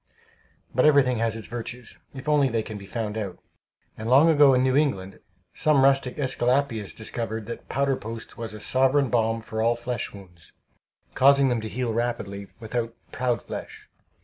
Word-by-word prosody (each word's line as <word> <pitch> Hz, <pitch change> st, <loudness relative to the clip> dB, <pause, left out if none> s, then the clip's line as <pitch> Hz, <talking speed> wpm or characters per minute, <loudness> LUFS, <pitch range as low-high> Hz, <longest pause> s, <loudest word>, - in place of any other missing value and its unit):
But 130 Hz, +4 st, +4 dB
everything 135 Hz, -5 st, +4 dB
has 115 Hz, -1 st, 0 dB
its 115 Hz, -, -6 dB
virtues, 120 Hz, +1 st, -7 dB
if 135 Hz, +1 st, -10 dB
only 145 Hz, -3 st, +3 dB
they 115 Hz, -2 st, -1 dB
can 110 Hz, -, -7 dB
be 100 Hz, -, -11 dB
found 110 Hz, -1 st, -3 dB
out; 100 Hz, -4 st, -5 dB, 0.6 s
and 110 Hz, +1 st, -5 dB
long 140 Hz, +6 st, +6 dB
ago, 145 Hz, -4 st, +6 dB
in 125 Hz, -, +3 dB
New 130 Hz, 0 st, +2 dB
England, 100 Hz, -11 st, 0 dB, 0.3 s
some 150 Hz, -3 st, +3 dB
rustic 135 Hz, -2 st, +2 dB
AEsculapius 130 Hz, -5 st, 0 dB
discovered 110 Hz, -1 st, -3 dB
that 115 Hz, +2 st, -8 dB
powder 140 Hz, 0 st, +1 dB
post 115 Hz, -1 st, -8 dB
was 115 Hz, -2 st, -6 dB
a -, -, -8 dB
sovereign 135 Hz, +3 st, +2 dB
balm 115 Hz, -1 st, +1 dB
for 110 Hz, 0 st, -4 dB
all 115 Hz, +1 st, +3 dB
flesh 120 Hz, -1 st, -4 dB
wounds, 90 Hz, -4 st, -15 dB, 0.6 s
causing 140 Hz, 0 st, +5 dB
them 120 Hz, -2 st, 0 dB
to 110 Hz, -, -5 dB
heal 125 Hz, -1 st, -2 dB
rapidly, 105 Hz, -4 st, -3 dB
without 115 Hz, 0 st, -3 dB, 0.2 s
"proud 125 Hz, -2 st, -1 dB
flesh." -, -, -8 dB
120 Hz, 175 wpm, -25 LUFS, 110-135 Hz, 0.6 s, long